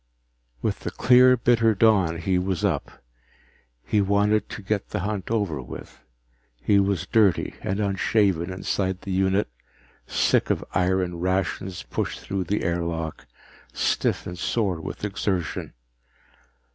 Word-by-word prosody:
With -, -, -1 dB
the -, -, -4 dB
clear 125 Hz, 0 st, +5 dB
bitter 115 Hz, -2 st, +3 dB
dawn 95 Hz, -6 st, +3 dB
he 90 Hz, +2 st, 0 dB
was 95 Hz, +2 st, -1 dB
up. 80 Hz, -9 st, -3 dB, 0.8 s
He 105 Hz, -, +2 dB
wanted 100 Hz, +1 st, +2 dB
to 105 Hz, -, -7 dB
get 100 Hz, +1 st, -2 dB
the 105 Hz, -, -3 dB
hunt 100 Hz, -1 st, -3 dB
over 100 Hz, -, -1 dB
with. 65 Hz, -, -10 dB, 0.6 s
He 100 Hz, +12 st, +3 dB
was 100 Hz, -3 st, 0 dB
dirty 105 Hz, -8 st, +2 dB
and 95 Hz, +2 st, -2 dB
unshaven 100 Hz, -3 st, +1 dB
inside 95 Hz, 0 st, -2 dB
the 100 Hz, -, -6 dB
unit, 95 Hz, +2 st, +2 dB, 0.6 s
sick -, -, +2 dB
of -, -, 0 dB
iron 90 Hz, -1 st, +1 dB
rations 95 Hz, 0 st, -1 dB
pushed -, -, -3 dB
through 95 Hz, -2 st, -3 dB
the 105 Hz, +5 st, -1 dB
airlock, 85 Hz, -3 st, -3 dB, 0.5 s
stiff -, -, 0 dB
and 90 Hz, 0 st, -7 dB
sore 95 Hz, -5 st, 0 dB
with 105 Hz, -, -5 dB
exertion. 95 Hz, -3 st, -2 dB
95 Hz, 135 wpm, -25 LUFS, 90-105 Hz, 0.8 s, clear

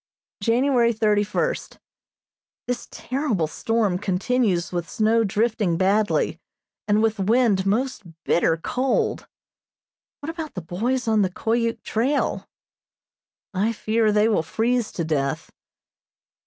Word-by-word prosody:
January 235 Hz, +2 st, +3 dB
thirty 210 Hz, -2 st, +2 dB
first: 480 Hz, -, -2 dB, 0.9 s
This 245 Hz, 0 st, -3 dB
terrible 255 Hz, -, -1 dB
storm 205 Hz, +4 st, 0 dB
continues 195 Hz, -1 st, 0 dB
with 175 Hz, -3 st, -3 dB
snow 225 Hz, +5 st, +2 dB
drifting 210 Hz, -4 st, 0 dB
badly, 205 Hz, +4 st, +1 dB, 0.5 s
and 210 Hz, +1 st, +3 dB
with 220 Hz, -1 st, +1 dB
wind 205 Hz, -2 st, +2 dB
most 255 Hz, +6 st, 0 dB, 0.2 s
bitter 165 Hz, -1 st, +2 dB
cold. 255 Hz, +10 st, -1 dB, 0.9 s
What 295 Hz, +3 st, -4 dB
about 320 Hz, -3 st, -7 dB
the 180 Hz, -, -4 dB
boys 230 Hz, +10 st, -2 dB
on 220 Hz, -1 st, +3 dB
the 190 Hz, -, +2 dB
Koyuk 230 Hz, +4 st, -1 dB
trail? 260 Hz, +6 st, 0 dB, 1.1 s
I 205 Hz, +4 st, +1 dB
fear 220 Hz, 0 st, +1 dB
they 210 Hz, +1 st, +3 dB
will 215 Hz, -7 st, +2 dB
freeze 230 Hz, +7 st, 0 dB
to 170 Hz, -, -2 dB
death. 140 Hz, -3 st, -2 dB
220 Hz, 115 wpm, -23 LUFS, 190-240 Hz, 1.1 s, January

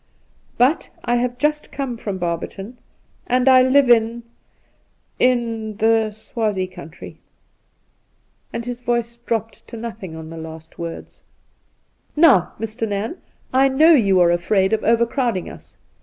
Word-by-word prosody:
' -, -, -38 dB
But 260 Hz, +7 st, +2 dB, 0.2 s
I 240 Hz, -, +2 dB
have 245 Hz, 0 st, -1 dB
just 300 Hz, +3 st, -1 dB
come 270 Hz, -4 st, -4 dB
from 205 Hz, -4 st, -5 dB
Barberton, 185 Hz, +6 st, -5 dB, 0.5 s
and 250 Hz, +1 st, +1 dB
I 260 Hz, -1 st, +7 dB
live 260 Hz, +1 st, +4 dB
in 235 Hz, 0 st, +3 dB, 0.5 s
— -, -, -43 dB
in 225 Hz, -3 st, -3 dB
the 225 Hz, 0 st, +2 dB
Swazie 210 Hz, -2 st, -2 dB
country.' 165 Hz, -3 st, -11 dB, 1.3 s
And 235 Hz, -, -5 dB
his 245 Hz, 0 st, -5 dB
voice 235 Hz, -1 st, -2 dB
dropped 225 Hz, -2 st, -4 dB
to 230 Hz, -, -9 dB
nothing 220 Hz, -7 st, -7 dB
on 160 Hz, 0 st, -9 dB
the 165 Hz, -, -8 dB
last 160 Hz, 0 st, -10 dB
words. 170 Hz, -1 st, -7 dB, 0.5 s
' -, -, -44 dB
Now, 290 Hz, -, +5 dB
Mr. 225 Hz, +1 st, -3 dB
Nairn, 210 Hz, -, -3 dB, 0.4 s
I 265 Hz, +1 st, +5 dB
know 305 Hz, +5 st, +5 dB
you 200 Hz, -10 st, +4 dB
are 170 Hz, -1 st, +5 dB
afraid 190 Hz, +3 st, +1 dB
of 220 Hz, -, 0 dB
over 230 Hz, +1 st, +3 dB
crowding 235 Hz, -7 st, -2 dB
us. -, -, -14 dB
225 Hz, 150 wpm, -20 LUFS, 195-245 Hz, 1.3 s, I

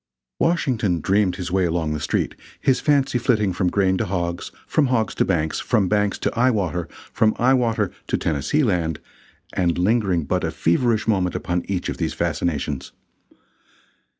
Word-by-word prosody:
Washington 120 Hz, -, +1 dB
dreamed 95 Hz, +2 st, +2 dB
his 90 Hz, -3 st, -5 dB
way 95 Hz, 0 st, +2 dB
along 80 Hz, -2 st, -1 dB
the 75 Hz, -, -3 dB
street, -, -, -1 dB, 0.3 s
his 130 Hz, -2 st, +2 dB
fancy 140 Hz, -4 st, +2 dB
flitting 105 Hz, -6 st, +1 dB
from 90 Hz, 0 st, +1 dB
grain 95 Hz, 0 st, +2 dB
to -, -, 0 dB
hogs, 85 Hz, -2 st, -3 dB
from 150 Hz, -3 st, +2 dB
hogs 115 Hz, -4 st, 0 dB
to -, -, +1 dB
banks, 80 Hz, -4 st, 0 dB
from 110 Hz, -6 st, +1 dB
banks 105 Hz, 0 st, +1 dB
to -, -, -2 dB
eye 125 Hz, +2 st, +4 dB
water, 90 Hz, -7 st, -1 dB, 0.3 s
from 110 Hz, -1 st, +2 dB
eye 130 Hz, +3 st, +4 dB
water 115 Hz, -6 st, +1 dB, 0.2 s
to -, -, 0 dB
Tennessee 80 Hz, -, 0 dB
Land, 85 Hz, -, 0 dB, 0.5 s
and 85 Hz, -2 st, +1 dB
lingering 95 Hz, -3 st, +2 dB
but 70 Hz, -, -1 dB
a -, -, 0 dB
feverish 110 Hz, +6 st, +1 dB
moment 95 Hz, -5 st, +1 dB
upon 90 Hz, 0 st, -2 dB
each 95 Hz, -2 st, -2 dB
of -, -, -3 dB
these -, -, -2 dB
fascinations. 75 Hz, -4 st, -2 dB
95 Hz, 170 wpm, -22 LUFS, 85-115 Hz, 0.5 s, eye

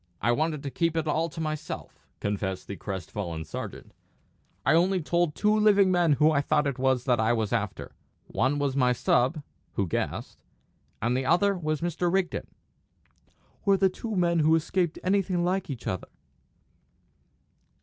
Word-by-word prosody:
"I 120 Hz, -, +2 dB
wanted 155 Hz, +3 st, 0 dB
to 140 Hz, -, -4 dB
keep 165 Hz, +2 st, 0 dB
it 160 Hz, -, 0 dB
all 160 Hz, +2 st, +1 dB
to 155 Hz, -, -9 dB
myself," 155 Hz, -1 st, -5 dB
confessed 100 Hz, -2 st, -2 dB
the 100 Hz, -, -6 dB
crest 95 Hz, -2 st, -6 dB
fallen 85 Hz, -6 st, -4 dB
sergeant. 75 Hz, -, -7 dB, 0.7 s
"I 140 Hz, -, +4 dB
only 180 Hz, +3 st, +3 dB
told 170 Hz, -1 st, 0 dB
two 210 Hz, 0 st, +2 dB
living 205 Hz, -3 st, +5 dB
men 175 Hz, -4 st, +3 dB
who 150 Hz, +3 st, +4 dB
I 145 Hz, -2 st, +2 dB
thought 150 Hz, +1 st, +1 dB
it 140 Hz, -2 st, -2 dB
was 130 Hz, -1 st, +2 dB
that 125 Hz, -4 st, +2 dB
I 110 Hz, +1 st, +3 dB
was 110 Hz, -3 st, -1 dB
after. -, -, -2 dB, 0.3 s
One 135 Hz, +3 st, 0 dB
was 140 Hz, -2 st, 0 dB
my 125 Hz, -2 st, +3 dB
sub 130 Hz, +5 st, +1 dB, 0.3 s
who 100 Hz, -, 0 dB
guessed 85 Hz, -, -4 dB, 0.6 s
and 120 Hz, +2 st, +1 dB
the 130 Hz, +1 st, -1 dB
other 200 Hz, +5 st, +3 dB
was 155 Hz, -3 st, -2 dB
Mr. 175 Hz, +1 st, 0 dB
Rigden." 190 Hz, -1 st, -1 dB, 1.2 s
"Were 200 Hz, -1 st, +4 dB
the 190 Hz, 0 st, +4 dB
two 220 Hz, +4 st, -5 dB
men 170 Hz, -2 st, +2 dB
who 160 Hz, +1 st, +4 dB
escaped 170 Hz, +1 st, 0 dB
anything 185 Hz, -2 st, +1 dB
like 185 Hz, 0 st, -1 dB
each 130 Hz, -4 st, -6 dB
other?" 95 Hz, -, -3 dB
155 Hz, 170 wpm, -27 LUFS, 130-175 Hz, 1.2 s, living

